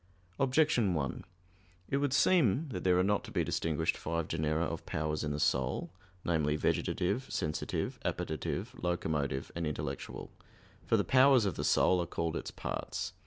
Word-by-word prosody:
Objection 130 Hz, -, +3 dB
1: 70 Hz, -4 st, -2 dB, 0.6 s
It 140 Hz, -, 0 dB
would 140 Hz, -1 st, +1 dB
seem 145 Hz, -, +3 dB
that 95 Hz, -8 st, -5 dB
there 90 Hz, -1 st, +4 dB
are 90 Hz, -, +4 dB
not 105 Hz, +1 st, +1 dB
to -, -, -9 dB
be -, -, 0 dB
distinguished 80 Hz, 0 st, 0 dB
five 85 Hz, 0 st, -2 dB
genera 80 Hz, 0 st, 0 dB
of 85 Hz, -1 st, -3 dB
powers 75 Hz, 0 st, -2 dB
in 75 Hz, -, -1 dB
the 75 Hz, 0 st, -2 dB
soul 80 Hz, -, 0 dB, 0.3 s
namely, 75 Hz, -3 st, +1 dB
vegetative, 100 Hz, -, 0 dB
sensitive, 75 Hz, 0 st, -2 dB
appetitive, 110 Hz, +8 st, -3 dB
locomotive, 75 Hz, -6 st, -1 dB
and 85 Hz, -2 st, -2 dB
intellectual. 75 Hz, -2 st, -5 dB, 0.6 s
For -, -, +4 dB
the -, -, +2 dB
powers 130 Hz, -3 st, +5 dB
of 95 Hz, -, 0 dB
the -, -, -4 dB
soul 90 Hz, -1 st, +4 dB
are 85 Hz, -, -3 dB
called 85 Hz, -1 st, -2 dB
its -, -, -4 dB
parts. -, -, -4 dB
85 Hz, 165 wpm, -32 LUFS, 75-115 Hz, 0.6 s, powers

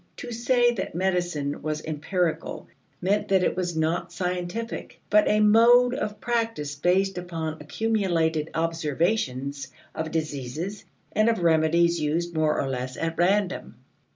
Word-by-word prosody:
To 245 Hz, -, -7 dB
say 240 Hz, +1 st, +3 dB
that 190 Hz, -7 st, -4 dB
medicine 175 Hz, -6 st, -1 dB
was 155 Hz, 0 st, -3 dB
empirical 160 Hz, +3 st, -2 dB, 0.4 s
meant 200 Hz, +3 st, +1 dB
that 190 Hz, -2 st, +3 dB
it -, -, +1 dB
was 175 Hz, -3 st, -2 dB
not 165 Hz, +2 st, 0 dB
scientific, 180 Hz, +5 st, -4 dB
but 210 Hz, 0 st, +5 dB
a 210 Hz, 0 st, +3 dB
mode 235 Hz, +4 st, +6 dB
of 210 Hz, -5 st, -3 dB
practice 225 Hz, -12 st, -1 dB
based 180 Hz, +5 st, +1 dB
upon 165 Hz, -3 st, -5 dB
accumulated 165 Hz, -4 st, 0 dB
observations 150 Hz, -, -1 dB, 0.3 s
of 160 Hz, 0 st, -3 dB
diseases 155 Hz, +5 st, -4 dB, 0.3 s
and 215 Hz, +2 st, +3 dB
of 225 Hz, -6 st, 0 dB
remedies 170 Hz, +1 st, +3 dB
used 170 Hz, +3 st, -1 dB
more 155 Hz, -1 st, +1 dB
or 135 Hz, -, -1 dB
less 130 Hz, -1 st, -4 dB
at 165 Hz, 0 st, -2 dB
random. 190 Hz, +1 st, +1 dB
175 Hz, 135 wpm, -26 LUFS, 155-205 Hz, 0.4 s, mode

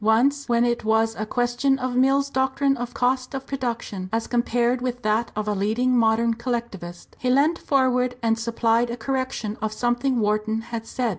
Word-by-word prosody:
Once 260 Hz, +6 st, +2 dB
when 235 Hz, 0 st, +3 dB
it 240 Hz, 0 st, 0 dB
was 220 Hz, +1 st, +2 dB
a 215 Hz, -, -4 dB
question 245 Hz, +3 st, +1 dB
of 255 Hz, -1 st, -3 dB
Mill's 275 Hz, +2 st, +3 dB
doctrine 270 Hz, +1 st, +1 dB
of 245 Hz, -1 st, -5 dB
cost 255 Hz, +2 st, 0 dB
of 270 Hz, 0 st, -5 dB
production 235 Hz, -8 st, -4 dB
as 225 Hz, +1 st, -1 dB
compared 240 Hz, +1 st, +1 dB
with 245 Hz, -1 st, -3 dB
that 215 Hz, +2 st, +1 dB
of 215 Hz, 0 st, -3 dB
a 210 Hz, -, +1 dB
leading 220 Hz, +6 st, +1 dB
modern 230 Hz, 0 st, +3 dB
collectivist, 230 Hz, -7 st, -5 dB
he 255 Hz, -, -1 dB
leant 290 Hz, +6 st, +3 dB
forward 255 Hz, -2 st, +1 dB
and 225 Hz, 0 st, +2 dB
supplied 230 Hz, +1 st, +1 dB
a 235 Hz, -, -4 dB
correction 260 Hz, -4 st, -3 dB
of 220 Hz, -1 st, -1 dB
something 240 Hz, +3 st, 0 dB
Wharton 215 Hz, +1 st, 0 dB
had 225 Hz, -1 st, -6 dB
said. 250 Hz, -2 st, -1 dB
240 Hz, 180 wpm, -24 LUFS, 225-255 Hz, -, when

